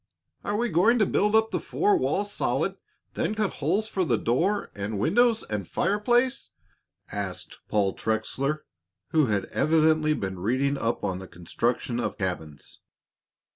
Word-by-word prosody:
"Are 205 Hz, -, -1 dB
we 240 Hz, +2 st, 0 dB
going 190 Hz, +9 st, +4 dB
to 215 Hz, -, +4 dB
build 210 Hz, +3 st, +2 dB
up 220 Hz, 0 st, +3 dB
the -, -, 0 dB
four 410 Hz, 0 st, +1 dB
walls 205 Hz, -, 0 dB
solid, -, -, 0 dB
and -, -, -25 dB, 0.3 s
then 215 Hz, -, -1 dB
cut 210 Hz, -2 st, 0 dB
holes 190 Hz, +10 st, +1 dB
for 190 Hz, -3 st, -1 dB
the 125 Hz, -9 st, +1 dB
door 175 Hz, -, 0 dB
and 100 Hz, +1 st, -4 dB
windows 235 Hz, -, +3 dB
and 105 Hz, -4 st, -4 dB
fireplace?" 240 Hz, -, +1 dB, 0.6 s
asked 100 Hz, -2 st, -5 dB
Paul 100 Hz, -2 st, +2 dB
Trexler, 135 Hz, +7 st, -2 dB, 0.4 s
who 155 Hz, -4 st, +3 dB
had 105 Hz, -3 st, 0 dB
evidently 155 Hz, -1 st, +3 dB
been 95 Hz, -5 st, -4 dB
reading 130 Hz, +8 st, +1 dB
up 115 Hz, -3 st, -2 dB
on 95 Hz, -2 st, -2 dB
the 95 Hz, -, -9 dB
construction 115 Hz, +8 st, -2 dB
of -, -, -2 dB
cabins. 80 Hz, -7 st, -5 dB
145 Hz, 155 wpm, -26 LUFS, -, 0.6 s, going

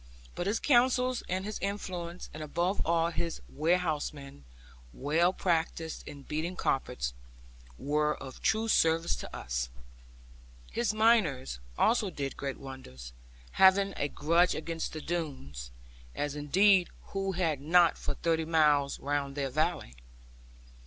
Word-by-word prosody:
But 175 Hz, -, -3 dB
his 210 Hz, +3 st, +1 dB
counsels, 255 Hz, -1 st, +3 dB
and 185 Hz, +2 st, -1 dB
his 215 Hz, 0 st, -4 dB
influence, 180 Hz, -3 st, -4 dB
and 155 Hz, -, -7 dB
above 175 Hz, +6 st, -1 dB
all 165 Hz, 0 st, +2 dB
his 170 Hz, 0 st, -3 dB
warehousemen, 150 Hz, -, -1 dB, 0.5 s
well 160 Hz, +6 st, +2 dB
practised 165 Hz, -3 st, -1 dB
in 145 Hz, -2 st, -9 dB
beating 160 Hz, +6 st, -3 dB
carpets, 60 Hz, -, -1 dB, 0.6 s
were 150 Hz, -, +1 dB
of 135 Hz, -1 st, -10 dB
true 220 Hz, +2 st, +1 dB
service 165 Hz, -5 st, +3 dB
to -, -, -8 dB
us. -, -, -3 dB, 1.0 s
His 235 Hz, -1 st, 0 dB
miners 215 Hz, -, +2 dB, 0.2 s
also 225 Hz, -3 st, +3 dB
did 140 Hz, -5 st, -4 dB
great 140 Hz, -1 st, -4 dB
wonders, 65 Hz, -, -10 dB, 0.4 s
having 195 Hz, +1 st, +5 dB
a 145 Hz, -, 0 dB
grudge 170 Hz, +5 st, +2 dB
against 165 Hz, +1 st, -4 dB
the 155 Hz, -, -5 dB
Doones; 135 Hz, -, -4 dB, 0.5 s
as 145 Hz, 0 st, -2 dB
indeed 185 Hz, +6 st, +4 dB, 0.2 s
who 195 Hz, -1 st, -2 dB
had 165 Hz, -6 st, 0 dB
not 170 Hz, +3 st, +5 dB
for -, -, -4 dB
thirty 165 Hz, -1 st, 0 dB
miles 150 Hz, -3 st, +3 dB
round 140 Hz, -1 st, -2 dB
their 140 Hz, -2 st, -2 dB
valley? 155 Hz, -, -1 dB
165 Hz, 130 wpm, -30 LUFS, 145-185 Hz, 1.0 s, having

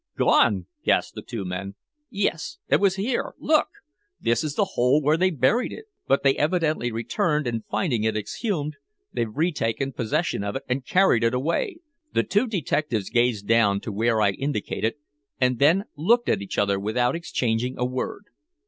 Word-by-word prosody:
"Gone!" 95 Hz, -4 st, +3 dB, 0.2 s
gasped -, -, +1 dB
the -, -, -7 dB
two 115 Hz, -5 st, -6 dB
men. 95 Hz, +2 st, -5 dB, 0.3 s
"Yes. 195 Hz, -, -2 dB
It -, -, +3 dB
was 195 Hz, -2 st, +3 dB
here. 225 Hz, +6 st, -2 dB
Look! 310 Hz, 0 st, +2 dB, 0.5 s
this 115 Hz, +7 st, +1 dB
is 150 Hz, -2 st, -3 dB
the 200 Hz, -2 st, +1 dB
hole 125 Hz, +4 st, +3 dB
where 150 Hz, +1 st, +2 dB
they 185 Hz, +3 st, +3 dB
buried 205 Hz, -, +1 dB
it! 440 Hz, -, -9 dB, 0.2 s
But 135 Hz, -, +2 dB
they 135 Hz, -1 st, +4 dB
evidently 155 Hz, -5 st, +1 dB
returned, 140 Hz, +7 st, 0 dB
and 115 Hz, -2 st, -2 dB
finding 125 Hz, -, 0 dB
it 110 Hz, -1 st, +1 dB
exhumed, 150 Hz, -, -3 dB, 0.4 s
they've 120 Hz, -2 st, -1 dB
retaken 135 Hz, -3 st, -1 dB
possession 135 Hz, -, -1 dB
of 100 Hz, +3 st, -3 dB
it 135 Hz, -, -4 dB
and 125 Hz, +1 st, -1 dB
carried 185 Hz, -11 st, +4 dB
it 115 Hz, +2 st, +2 dB
away!" 165 Hz, -, -1 dB, 0.4 s
The -, -, +3 dB
two 210 Hz, +5 st, +1 dB
detectives 150 Hz, -, -1 dB
gazed 120 Hz, -4 st, +1 dB
down 110 Hz, -3 st, +4 dB
to 110 Hz, -, -5 dB
where 110 Hz, +2 st, +1 dB
I 100 Hz, -, +4 dB
indicated, 115 Hz, -2 st, -2 dB, 0.4 s
and 125 Hz, -2 st, +2 dB
then 165 Hz, +8 st, +4 dB
looked 235 Hz, +11 st, +2 dB
at 100 Hz, -, +1 dB
each 100 Hz, -, -6 dB
other 100 Hz, -1 st, +2 dB
without 120 Hz, +6 st, 0 dB
exchanging 125 Hz, -7 st, -1 dB
a 125 Hz, -, 0 dB
word. 130 Hz, +10 st, -4 dB
130 Hz, 175 wpm, -24 LUFS, 115-165 Hz, 0.5 s, they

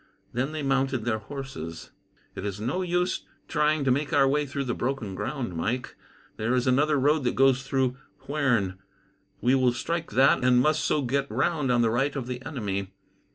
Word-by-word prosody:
Then 130 Hz, +5 st, -1 dB
they 155 Hz, -1 st, -4 dB
mounted 135 Hz, -3 st, 0 dB
their 110 Hz, -2 st, 0 dB
horses. 110 Hz, -, -7 dB, 0.4 s
"It -, -, -7 dB
is 100 Hz, -1 st, -4 dB
no 130 Hz, -, -1 dB
use 180 Hz, 0 st, 0 dB, 0.3 s
trying 150 Hz, -1 st, +1 dB
to 135 Hz, -, +2 dB
make 145 Hz, +3 st, 0 dB
our 140 Hz, -1 st, +4 dB
way 145 Hz, +2 st, +1 dB
through 140 Hz, +1 st, -3 dB
the 125 Hz, -2 st, -2 dB
broken 120 Hz, -6 st, -2 dB
ground, 120 Hz, -, -4 dB
Mike. 120 Hz, +10 st, -2 dB, 0.4 s
There 115 Hz, +4 st, 0 dB
is 125 Hz, -, +1 dB
another 145 Hz, +4 st, +3 dB
road 145 Hz, +2 st, +3 dB
that 120 Hz, -, +1 dB
goes 135 Hz, -1 st, +4 dB
through 135 Hz, -2 st, 0 dB, 0.3 s
Huerne. 120 Hz, -11 st, 0 dB, 0.6 s
We 125 Hz, +2 st, +3 dB
will 130 Hz, -2 st, +3 dB
strike 165 Hz, +7 st, -3 dB
that, 135 Hz, 0 st, +4 dB
and 125 Hz, -1 st, +5 dB
must 155 Hz, +4 st, +2 dB
so 150 Hz, -, +1 dB
get 140 Hz, +2 st, 0 dB
round 150 Hz, -7 st, 0 dB
on 120 Hz, -1 st, +3 dB
the 115 Hz, -, +2 dB
right 135 Hz, +5 st, 0 dB
of 135 Hz, -3 st, -3 dB
the 125 Hz, 0 st, -5 dB
enemy. 100 Hz, -9 st, -4 dB
130 Hz, 190 wpm, -27 LUFS, 120-145 Hz, 0.6 s, and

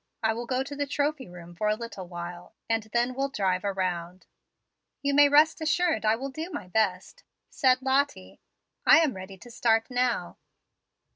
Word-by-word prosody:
I 220 Hz, 0 st, +2 dB
will 235 Hz, +1 st, -6 dB
go 255 Hz, +1 st, 0 dB
to 285 Hz, +1 st, -8 dB
the 285 Hz, 0 st, -2 dB
Trophy 290 Hz, -2 st, -1 dB
room 175 Hz, -1 st, -11 dB
for 210 Hz, +5 st, -2 dB
a 210 Hz, -, +2 dB
little 220 Hz, -5 st, -8 dB
while, 175 Hz, +3 st, -8 dB
and 225 Hz, 0 st, +1 dB
then 240 Hz, +1 st, +1 dB
will 275 Hz, +2 st, -1 dB
drive 190 Hz, -7 st, -1 dB
around." 185 Hz, -2 st, -3 dB, 0.8 s
"You 280 Hz, 0 st, +1 dB
may 290 Hz, 0 st, +6 dB
rest 305 Hz, +3 st, +4 dB
assured 320 Hz, -2 st, +1 dB
I 215 Hz, +1 st, +4 dB
will 270 Hz, +4 st, -5 dB
do 315 Hz, +5 st, -6 dB
my 185 Hz, -, -6 dB
best," 205 Hz, -, -1 dB, 0.3 s
said 255 Hz, -1 st, +2 dB
Lottie. 275 Hz, +2 st, -1 dB, 0.4 s
"I -, -, +7 dB
am 300 Hz, -6 st, +1 dB
ready 190 Hz, +1 st, -9 dB
to 240 Hz, +5 st, -14 dB
start 225 Hz, 0 st, +1 dB
now." 250 Hz, -1 st, -1 dB
235 Hz, 180 wpm, -27 LUFS, 190-280 Hz, 0.8 s, I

